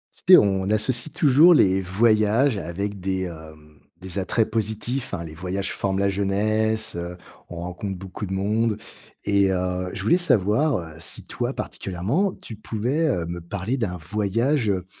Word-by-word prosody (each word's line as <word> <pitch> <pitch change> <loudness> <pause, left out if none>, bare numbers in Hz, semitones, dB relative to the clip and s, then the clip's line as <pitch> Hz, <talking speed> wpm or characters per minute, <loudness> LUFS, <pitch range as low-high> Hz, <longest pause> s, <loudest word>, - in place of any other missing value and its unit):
Tu 185 - +4
sais - - +9
on 95 -1 +2
associe 120 +6 +1
toujours 155 +5 +6
les 95 -8 +4
voyages 110 +5 +2
avec 100 +3 -4
des, 95 0 -2
hem, 80 -3 -10 0.2
des 95 +1 -5
attraits 110 +4 +1
positifs, 115 +4 -2
hein. 85 - -5
Les 80 -2 -9
voyages 95 +3 -4
forment 95 -1 -1
la 100 0 +1
jeunesse, 110 +3 0
heu, 85 +1 -5 0.3
on - - -8
rencontre 90 +2 -5
beaucoup 95 +2 -7
de 95 - -4
monde 105 +3 0 0.5
et 100 -1 +3
heu, 90 0 -1
je 95 - -6
voulais 175 - +3
savoir, 125 - +2
heu, 80 -3 -7
si - - 0
toi - - -3
particulièrement, 105 - -2
tu 115 - -8
pouvais, 120 +9 -1
heu, 90 - 0
me 85 +1 -5
parler 95 +7 -3
d'un 95 -7 -2
voyage, 110 - 0
heu, 90 -2 -1
100 Hz, 170 wpm, -23 LUFS, 90-110 Hz, 0.5 s, sais